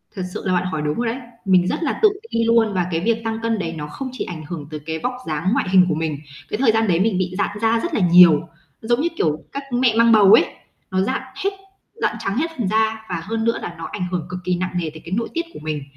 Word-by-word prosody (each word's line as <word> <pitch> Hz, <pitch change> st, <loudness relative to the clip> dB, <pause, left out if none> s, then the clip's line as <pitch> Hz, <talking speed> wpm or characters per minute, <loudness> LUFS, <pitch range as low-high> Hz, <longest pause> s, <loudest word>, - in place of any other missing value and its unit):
Thật 190 Hz, -, -3 dB
sự -, -, -5 dB
là 185 Hz, -, +1 dB
bạn 180 Hz, 0 st, +1 dB
hỏi 160 Hz, -4 st, -2 dB
đúng 150 Hz, 0 st, -1 dB
rồi 240 Hz, -1 st, 0 dB
đấy. 230 Hz, -, -2 dB, 0.3 s
Mình 185 Hz, -2 st, +4 dB
rất 335 Hz, -, -1 dB
là 295 Hz, -, -1 dB
tự 430 Hz, -, +7 dB, 0.2 s
ti 230 Hz, -, +1 dB
luôn, 230 Hz, -2 st, +3 dB
và 180 Hz, -2 st, 0 dB
cái 165 Hz, -, 0 dB
việc 230 Hz, +3 st, +1 dB
tăng 225 Hz, 0 st, -3 dB
cân 225 Hz, -1 st, 0 dB
đấy 165 Hz, -3 st, -3 dB
nó 150 Hz, -1 st, -5 dB
không 260 Hz, -, -6 dB
chỉ 255 Hz, -, -4 dB
ảnh 165 Hz, -3 st, -7 dB
hưởng 150 Hz, -2 st, -6 dB
tới 155 Hz, -1 st, -6 dB
cái 160 Hz, +2 st, -5 dB
vóc 250 Hz, +9 st, -2 dB
dáng, 155 Hz, +3 st, -1 dB
ngoại -, -, 0 dB
hình 185 Hz, -1 st, +6 dB
của 160 Hz, -, +1 dB
mình. 155 Hz, -2 st, -2 dB, 0.3 s
Cái -, -, -2 dB
thời 235 Hz, -2 st, +4 dB
gian 225 Hz, 0 st, +1 dB
đấy 170 Hz, -3 st, +2 dB
mình 200 Hz, 0 st, +2 dB
bị 185 Hz, -1 st, -1 dB
rạn 205 Hz, 0 st, -1 dB
da 225 Hz, 0 st, +3 dB
rất 345 Hz, +7 st, -3 dB
là 275 Hz, -, +1 dB
nhiều, 175 Hz, -3 st, +6 dB, 0.3 s
giống 240 Hz, +3 st, +1 dB
như, 330 Hz, -, +2 dB
kiểu, 155 Hz, -1 st, 0 dB
các 280 Hz, -, -5 dB
mẹ 245 Hz, -2 st, +2 dB
mang 230 Hz, 0 st, +5 dB
bầu 210 Hz, -3 st, +7 dB
ấy, -, -, +7 dB, 0.5 s
nó 185 Hz, 0 st, +1 dB
rạn 260 Hz, +8 st, -1 dB, 0.2 s
hết, 395 Hz, -, +3 dB, 0.4 s
rạn -, -, -1 dB
trắng 195 Hz, +3 st, -2 dB
hết 325 Hz, +4 st, 0 dB
phần 230 Hz, -6 st, -1 dB
da, 220 Hz, +1 st, 0 dB
và 175 Hz, -2 st, -2 dB
hơn 225 Hz, +4 st, -2 dB
nữa 230 Hz, 0 st, +1 dB
là 175 Hz, -, -6 dB
nó 165 Hz, -, -6 dB
ảnh 195 Hz, -, -4 dB
hưởng 175 Hz, -3 st, -2 dB
cực 180 Hz, 0 st, -5 dB
kỳ 180 Hz, 0 st, 0 dB
nặng 185 Hz, +1 st, -2 dB
nề 170 Hz, -3 st, -1 dB
tới 160 Hz, +1 st, -12 dB
cái 170 Hz, -, -9 dB
nội 230 Hz, +4 st, -1 dB
tiết 335 Hz, 0 st, -1 dB
của -, -, -9 dB
mình. 150 Hz, -1 st, -4 dB
190 Hz, 290 wpm, -21 LUFS, 170-230 Hz, 0.5 s, tự